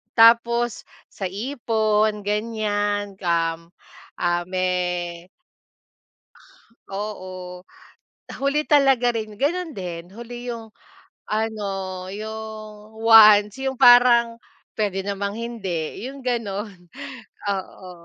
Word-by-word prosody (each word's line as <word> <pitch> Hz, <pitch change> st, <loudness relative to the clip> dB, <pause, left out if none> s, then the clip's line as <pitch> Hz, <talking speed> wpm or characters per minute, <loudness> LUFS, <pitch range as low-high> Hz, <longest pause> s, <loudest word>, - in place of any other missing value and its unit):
Tapos 235 Hz, 0 st, +4 dB, 0.2 s
sa 195 Hz, -, -4 dB
ipon 215 Hz, -1 st, 0 dB
ganyan, 205 Hz, -1 st, -2 dB
um, 165 Hz, -2 st, -1 dB, 0.5 s
ah, 175 Hz, 0 st, +1 dB
me 180 Hz, -2 st, -2 dB, 1.7 s
Oo, 185 Hz, -3 st, -6 dB, 0.8 s
huli 280 Hz, +2 st, +1 dB
talaga 270 Hz, -4 st, +4 dB
rin 215 Hz, -2 st, -5 dB
Gano'n 330 Hz, +5 st, -1 dB
din 175 Hz, -2 st, -6 dB
huli 240 Hz, +2 st, -8 dB
'yong 230 Hz, -2 st, -7 dB, 0.6 s
ano 215 Hz, -1 st, -2 dB, 0.4 s
'yong 215 Hz, 0 st, -8 dB
wants 215 Hz, -2 st, +7 dB
'yong 265 Hz, 0 st, -2 dB
parang 240 Hz, -1 st, +6 dB, 0.4 s
pwede 195 Hz, -2 st, -1 dB
namang 200 Hz, +1 st, -3 dB
hindi 215 Hz, -6 st, -4 dB
'yong 275 Hz, 0 st, -10 dB
gano'n, 210 Hz, -5 st, -3 dB, 0.7 s
oo. 190 Hz, -1 st, -6 dB
215 Hz, 85 wpm, -23 LUFS, 190-235 Hz, 1.7 s, wants